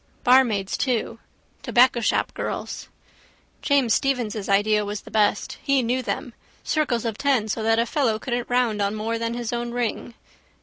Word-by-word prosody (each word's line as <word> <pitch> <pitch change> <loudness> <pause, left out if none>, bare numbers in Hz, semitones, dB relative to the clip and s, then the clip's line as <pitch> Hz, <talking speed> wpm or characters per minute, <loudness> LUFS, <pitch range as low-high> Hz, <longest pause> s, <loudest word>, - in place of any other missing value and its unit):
Barmaids 240 -6 +3
too. 230 -3 -1 0.4
Tobaccoshopgirls. 240 -2 0 0.7
James 275 -6 +2
Stephens' 235 -7 -1
idea 210 +1 +3
was 205 0 -5
the - - -14
best. 210 -1 0
He 275 -2 +2
knew 250 +3 0
them. 250 0 -4 0.3
Circles 255 -7 0
of 225 -2 -3
ten 270 -6 +1
so 220 +1 -2
that 225 +1 +2
a 230 - +2
fellow 240 -3 0
couldn't 240 +1 -3
round 245 -4 +1
on 200 +1 0
more 225 +2 -2
than 230 0 -2
his 240 -1 -4
own 240 0 -2
ring. 240 -1 -3
230 Hz, 150 wpm, -23 LUFS, 215-250 Hz, 0.7 s, Barmaids